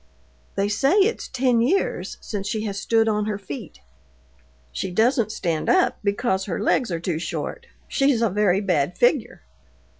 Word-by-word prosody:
"They 200 - +1
say 270 - +2
it's 420 +4 +2
ten 250 -2 +1
years 310 +12 0
since 200 -2 -5
she 215 0 -2
has 200 -2 -3
stood 225 +2 +2
on 210 -1 +1
her 210 -2 -2
feet." 145 - -9 0.9
"She 65 - -3
doesn't 220 +3 +2
stand 165 -6 -2
up 370 -1 +3
because 200 -2 0
her 185 - -3
legs 225 +3 +1
are 170 - -2
too 170 -2 -2
short. 475 - -5 0.2
She's 275 -4 +2
a 225 - +2
very 200 -1 +2
bad 180 -4 0
figure." 245 - +1
210 Hz, 160 wpm, -23 LUFS, 190-245 Hz, 0.9 s, up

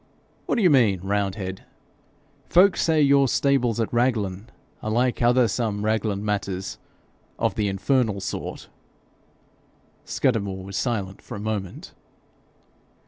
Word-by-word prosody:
'What - - +1
do 230 - +1
you 180 - +5
mean, 110 -10 +3
roundhead?' 95 -1 -2 0.9
'Folk 185 +2 +5
say 160 -2 +2
your 140 -1 +5
stables 125 -4 +1
at 115 - -1
Raglan 110 -4 0 0.3
are 110 - -3
like 120 +3 +1
other 120 0 +4
some 105 -2 -2
Raglan 110 -2 -1
matters 100 -2 -3 0.6
of - - 0
the 105 - -1
infernal 105 +2 0
sort.' 95 - -5 1.4
Scudamore 100 -7 -1
was 95 0 -8
silent 100 -5 -2
for - - -9
a - - -6
moment. 105 -3 -5
110 Hz, 125 wpm, -24 LUFS, 100-125 Hz, 1.4 s, you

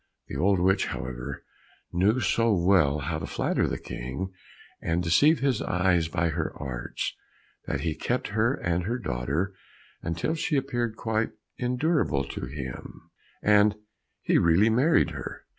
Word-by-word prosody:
The - - -5
old 95 +2 +3
witch, 95 +2 +3
however, 65 +2 -5 0.5
knew 100 +8 +3
so 115 -1 +2
well 85 -5 +4
how 80 +3 -2
to 80 - -5
flatter - - 0
the - - -2
King 65 +11 -5 0.5
and 85 +1 0
deceive 145 - +4
his 135 -2 +1
eyes 90 -2 +2
by 85 +1 0
her 80 0 -2
arts, 65 -3 -4 0.5
that - - -1
he 80 -2 0
kept 120 +10 -2
her 110 +6 +2
and 85 -8 -1
her 120 +4 -1
daughter 75 - -2 0.5
until 85 - -1
she 155 -2 0
appeared 120 -4 -1
quite 110 -1 -1 0.3
endurable 125 - +1
to 65 - -5
him, 65 -2 -8 0.3
and 105 0 +5 0.5
he - - +3
really 90 +7 +4
married 140 +9 +3
her. - - -7
95 Hz, 145 wpm, -27 LUFS, 80-115 Hz, 0.5 s, and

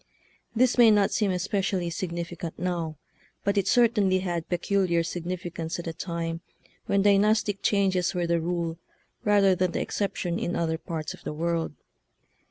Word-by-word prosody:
This 250 +1 +3
may 235 -2 +8
not 205 -2 +4
seem 210 -3 +1
especially 185 -1 -1
significant 170 0 -5
now, 170 -3 -2 0.5
but 200 0 +1
it 200 -1 +1
certainly 215 -6 +4
had 175 -3 -3
peculiar 175 -1 +1
signifi 175 +1 -4
cance 165 -1 -4
at 175 - -6
a 165 - -3
time 165 0 -4 0.5
when 200 -1 +2
dynastic 205 0 +3
changes 190 -3 +1
were 175 -1 0
the 170 -1 +1
rule 170 -1 -2 0.4
rather 200 -2 +4
than 180 -1 0
the - - -1
exception 180 -3 -2
in 175 - -2
other 160 -1 -1
parts 160 -4 -5
of - - -14
the - - -4
world. 165 +1 -1
180 Hz, 160 wpm, -27 LUFS, 170-200 Hz, 0.5 s, may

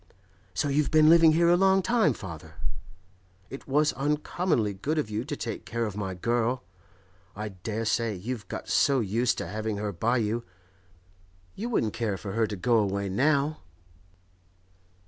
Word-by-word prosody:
'So - - 0
you've 145 +1 +1
been 155 0 +6
living 165 -2 +7
here 170 +1 +3
a 175 - +6
long 190 +1 +4
time, 230 -9 +3
father? 85 - -8 1.0
It 135 - -9
was 150 +2 +2
uncommonly 150 - 0
good 145 +12 -2
of 130 -8 -1
you 105 +2 -2
to 145 0 -4
take 115 - -5
care 115 0 -2
of 105 -3 -5
my 95 -3 -3
girl. 120 +5 0 0.7
I 105 +1 -4
dare 105 +4 -4
say 115 0 0
you've 110 +4 -5
got - - -6
so 140 -2 +3
used 115 +2 0
to - - -4
having 110 +2 -3
her 105 0 -2
by 115 +7 0
you, 115 +1 -1 1.1
you 230 +4 -4
wouldn't 115 - 0
care 110 -3 -2
for 100 +2 -6
her 110 +1 +1
to 105 - -4
go 115 +4 +2
away 100 -1 -1
now? 145 +7 +1
115 Hz, 165 wpm, -27 LUFS, 105-150 Hz, 1.1 s, living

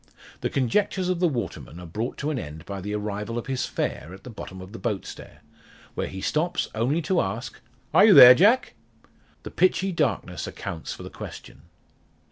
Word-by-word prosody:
The - - -2
conjectures 185 - 0
of 180 -2 0
the 180 - +3
waterman, 105 - -5
are 90 - -9
brought 110 +9 -4
to 150 - -2
an 145 - -2
end 75 -1 -8
by 100 -1 -6
the 105 +2 -4
arrival 105 +2 -4
of 120 - -4
his 135 -1 -2
fare 85 +4 -4
at 95 - -17
the 125 - -9
bottom 95 -3 -9
of 95 +1 -10
the 115 - -9
boat 100 -3 -2
stair, - - -11 0.5
where - - -3
he 95 - -7
stops 170 - -1
only 130 +9 0
to 185 0 +2
ask 110 +6 -5 0.3
"Are - - +7
you 215 - +7
there, 125 0 +12
Jack?" 210 - +3 0.7
The - - -8
pitchy 185 +1 +2
darkness 155 -7 -1
accounts 80 -2 -6
for - - -8
the - - -9
question. - - -10
120 Hz, 195 wpm, -25 LUFS, -, 0.7 s, there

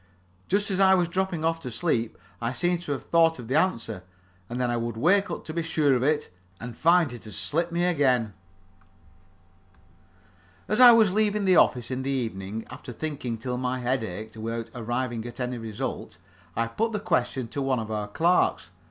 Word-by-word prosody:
Just 205 +2 +1
as 190 - -1
I 190 -1 +6
was 180 -2 +2
dropping 180 -2 -2
off 165 0 +1
to 130 - -6
sleep, 115 -2 -1 0.2
I 115 +2 -1
seemed 175 +4 0
to 170 - -5
have 140 - -3
thought 165 -1 +3
of 120 -3 -9
the 130 - -2
answer, 115 - 0 0.5
and 120 +1 -4
then 125 -1 0
I - - 0
would 115 -1 -3
wake 195 - +3
up - - -5
to 155 - -6
be 170 - -1
sure 155 -4 +2
of 125 - +1
it, 150 -1 0 0.3
and 120 0 -7
find 165 -3 +3
it 120 - -10
had 105 - -9
slipped 170 +3 -2
me 170 +1 +1
again. 130 - +2 2.3
As 215 - 0
I 250 -1 +11
was 220 -5 +5
leaving 210 -1 +1
the 185 -2 +5
office, 125 0 +3
in 130 0 -2
the 135 - -3
evening, 110 -5 -3
after 130 0 -9
thinking 130 -3 -4
till 125 +2 -4
my 130 0 -1
head 125 0 0
ached 110 +2 -7
without 115 +1 -4
arriving 120 0 -3
at 120 +1 -10
any 125 -1 -3
result, 110 -6 -5 0.4
I 115 - +1
put 220 - -2
the 210 - -1
question 125 - -1
to 140 - -4
one 135 -1 +1
of 110 -1 -5
our 105 -1 -2
clerks. 165 - +1
130 Hz, 200 wpm, -26 LUFS, 115-170 Hz, 2.3 s, I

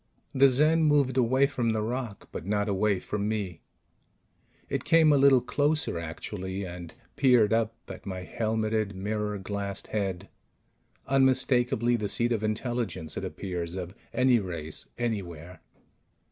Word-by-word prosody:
The 135 +1 +6
Zen 155 +5 +3
moved 145 -4 +3
away 130 +2 +3
from 120 -5 0
the 110 -1 -1
rock, 120 -2 -4
but - - -6
not 105 +2 0
away 100 0 +1
from 100 +2 -3
me. 100 -6 -3 1.1
It - - -2
came 160 -1 +5
a - - +5
little 135 -2 +6
closer, 150 - 0
actually, 95 +4 -5
and 85 0 -8 0.2
peered 125 -6 +4
up 115 0 +1
at - - -9
my 95 -1 -4
helmeted, 110 0 -1
mirror 105 +1 -2
glassed 100 0 -5
head 95 -3 -2 0.8
unmistakably 125 -3 +2
the 105 -2 -3
seat 120 +3 +1
of 110 -2 0
intelligence, 110 - -2
it - - -4
appears, 90 -3 -4
of 90 -1 -5 0.2
any 125 -2 +4
race 85 -6 -4
anywhere. 90 -7 -4
110 Hz, 140 wpm, -28 LUFS, 95-125 Hz, 1.1 s, The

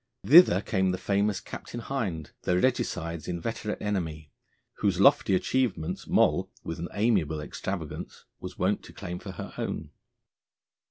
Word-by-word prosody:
Thither 150 - +8
came 95 -1 +1
the 90 - 0
famous 100 +1 +1
Captain 120 - -8
Hind, 105 - -3
the 90 - +1
Regicides' 85 - -1
inveterate 105 +5 -3
enemy, 80 -8 -3 0.5
whose 95 -3 +1
lofty 110 -3 +5
achievements 95 -7 -1
Moll, - - +3
with 80 - -5
an 85 - -3
amiable 100 -8 +1
extravagance, 75 - -6
was - - -8
wont - - +1
to - - -13
claim 90 0 -6
for 95 - -8
her - - -7
own. - - -4
95 Hz, 140 wpm, -28 LUFS, 85-105 Hz, 0.5 s, Thither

